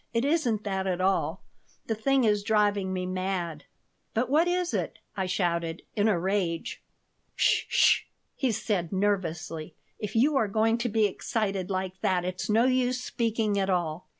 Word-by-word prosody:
"It 230 Hz, +3 st, +2 dB
isn't 255 Hz, -9 st, +1 dB
that 190 Hz, -2 st, -2 dB
at 180 Hz, -1 st, -1 dB
all. 190 Hz, +1 st, 0 dB, 0.4 s
The 225 Hz, -, -1 dB
thing 265 Hz, +4 st, +2 dB
is 210 Hz, -2 st, +3 dB
driving 205 Hz, -2 st, +1 dB
me 185 Hz, -1 st, -2 dB
mad." 185 Hz, -4 st, -3 dB, 0.5 s
"But 240 Hz, +3 st, 0 dB
what 320 Hz, +4 st, +4 dB
is 355 Hz, 0 st, 0 dB
it?" -, -, -2 dB, 0.2 s
I 190 Hz, -2 st, -1 dB
shouted, 170 Hz, -2 st, -1 dB
in 210 Hz, 0 st, +2 dB
a 210 Hz, -5 st, +3 dB
rage 180 Hz, -2 st, -1 dB, 0.6 s
"'S -, -, +3 dB
sh!" -, -, +4 dB, 0.3 s
he 260 Hz, -3 st, +1 dB
said, 205 Hz, -5 st, -1 dB
nervously. 175 Hz, -5 st, -2 dB, 0.2 s
"If 210 Hz, 0 st, -5 dB
you 280 Hz, +6 st, +4 dB
are 225 Hz, -, +2 dB
going 225 Hz, +3 st, +2 dB
to 240 Hz, 0 st, -1 dB
be 220 Hz, 0 st, +3 dB
excited 195 Hz, -1 st, -2 dB
like 185 Hz, -1 st, -3 dB
that 180 Hz, -2 st, +1 dB
it's 185 Hz, +2 st, -4 dB
no 225 Hz, +3 st, +4 dB
use 255 Hz, -1 st, +2 dB
speaking 225 Hz, -4 st, 0 dB
at 195 Hz, 0 st, 0 dB
all. 175 Hz, -2 st, -1 dB
200 Hz, 170 wpm, -28 LUFS, 185-225 Hz, 0.6 s, what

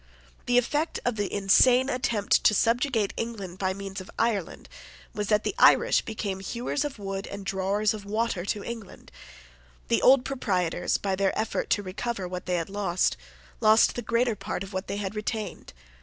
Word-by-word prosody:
The 245 Hz, -, +3 dB
effect 295 Hz, +6 st, 0 dB
of 245 Hz, -1 st, +1 dB
the 205 Hz, -2 st, -2 dB
insane 245 Hz, +6 st, +4 dB
attempt 235 Hz, -6 st, +1 dB
to 210 Hz, -, +6 dB
subjugate 230 Hz, -1 st, +1 dB
England 200 Hz, -6 st, -5 dB
by 190 Hz, -1 st, 0 dB
means 195 Hz, 0 st, -6 dB
of 185 Hz, -, -12 dB
Ireland 215 Hz, -7 st, -1 dB, 0.5 s
was 210 Hz, -1 st, -3 dB
that 210 Hz, 0 st, +2 dB
the -, -, -1 dB
Irish -, -, +5 dB
became 205 Hz, -3 st, -4 dB
hewers 240 Hz, +8 st, -2 dB
of 290 Hz, -4 st, -5 dB
wood 195 Hz, -1 st, -5 dB
and 200 Hz, -1 st, -7 dB
drawers 195 Hz, +2 st, 0 dB
of 215 Hz, -2 st, -7 dB
water 215 Hz, -2 st, -1 dB
to 205 Hz, +2 st, -2 dB
the -, -, -10 dB
English. 230 Hz, -4 st, -8 dB, 0.8 s
The -, -, +2 dB
old 260 Hz, 0 st, +6 dB
proprietors, 185 Hz, -10 st, 0 dB
by 195 Hz, -1 st, -1 dB
their 195 Hz, 0 st, 0 dB
effort 220 Hz, -, -2 dB
to 205 Hz, -, +1 dB
recover 195 Hz, +1 st, -4 dB
what 180 Hz, 0 st, -6 dB
they 180 Hz, -, +1 dB
had 170 Hz, +2 st, -3 dB
lost, 195 Hz, -3 st, 0 dB, 0.4 s
lost 220 Hz, 0 st, +5 dB
the 240 Hz, -, -4 dB
greater 235 Hz, +1 st, +1 dB
part 195 Hz, -1 st, -4 dB
of 195 Hz, +1 st, -10 dB
what 190 Hz, +1 st, -3 dB
they 200 Hz, -, -3 dB
had 200 Hz, -1 st, -3 dB
retained. 215 Hz, 0 st, -4 dB
205 Hz, 185 wpm, -27 LUFS, 195-235 Hz, 0.8 s, to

